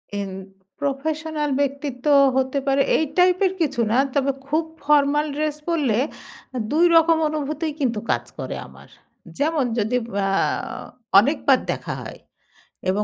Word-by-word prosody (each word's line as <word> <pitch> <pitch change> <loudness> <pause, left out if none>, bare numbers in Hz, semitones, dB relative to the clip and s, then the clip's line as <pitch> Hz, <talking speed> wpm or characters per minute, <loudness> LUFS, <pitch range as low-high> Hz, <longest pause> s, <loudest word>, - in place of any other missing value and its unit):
M 200 -1 -3 0.5
professional 300 +2 -2
ব্যক্তিত্ব 280 -2 -3 0.3
হতে 265 +1 +1
পারে 275 0 +3 0.2
এই 315 - +1
টাইপের 365 +1 +4
কিছু 280 -6 0
না। 235 - +3 0.2
তবে 275 -1 +2 0.2
খুব 310 +3 +1 0.2
ফরমাল 295 0 +3
ড্রেস 305 0 -1
পড়লে 280 -10 +1 0.6
আ - - -2
২ 330 +3 +4
রকম 330 0 +5
অনুভূতিই 305 +1 -3
কিন্তু 240 -6 0
কাজ - - 0 0.2
করে - - -4
আমার। - - -16 0.5
যেমন 300 -1 +1
যদি 225 +3 0 0.3
আ - - 0 0.9
অনেকবার 275 +2 +3
দেখা - - -4
হয়। - - -9 0.7
এবং 200 +3 +1
285 Hz, 135 wpm, -22 LUFS, 265-310 Hz, 0.9 s, রকম